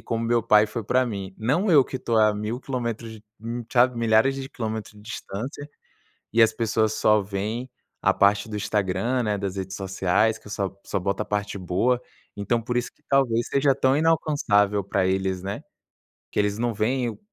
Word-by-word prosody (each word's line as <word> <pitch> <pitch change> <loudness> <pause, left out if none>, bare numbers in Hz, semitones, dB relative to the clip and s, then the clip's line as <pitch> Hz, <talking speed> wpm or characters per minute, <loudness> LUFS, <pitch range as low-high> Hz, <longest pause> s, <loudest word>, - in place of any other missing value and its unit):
como 115 0 -3
meu 120 0 +2
pai 105 -1 +5
foi 110 0 -5
para 130 +3 +2
mim. 100 -5 -5
Não 145 - 0
eu 140 -5 +7
que - - -5
estou 115 -2 -1
a 110 -1 +5
1,000 105 +4 -4
quilómetros, 115 -4 -4 0.2
hum, 115 +1 -5
sabe 125 -1 +4
milhares 115 +4 +3
de 135 0 -6
quilômetros 110 -2 -5
de 105 - -15
distância", 120 +6 -6 0.6
e 115 0 +5
as 110 - +5
pessoas 110 -1 0
só 105 -1 +3
veem 105 +6 -4 0.3
a - - +4
parte 100 +2 +3
do 105 - -4
Instagram, 105 +4 0
né, 105 -1 0
das 100 -1 -4
redes 95 0 -4
sociais 95 +3 +1
que - - -23
eu - - -9
só 100 -2 -2
só - - -2
boto 100 +3 -1
a - - -6
parte 105 -1 -3
boa, 100 +8 +1 0.4
então, 105 +3 0
por 120 +1 -3
isso 120 - -1
que - - -36
talvez, 120 -4 +2
seja 140 0 +3
tão 130 0 +2
inalcançável 140 -11 +2
para 95 -1 0
eles, 95 -1 -1
né, 100 +1 -5 0.7
que - - -4
eles 105 0 +1
não 120 0 -1
veem 120 +4 0
o, 110 - -11
110 Hz, 195 wpm, -24 LUFS, 100-125 Hz, 0.7 s, eu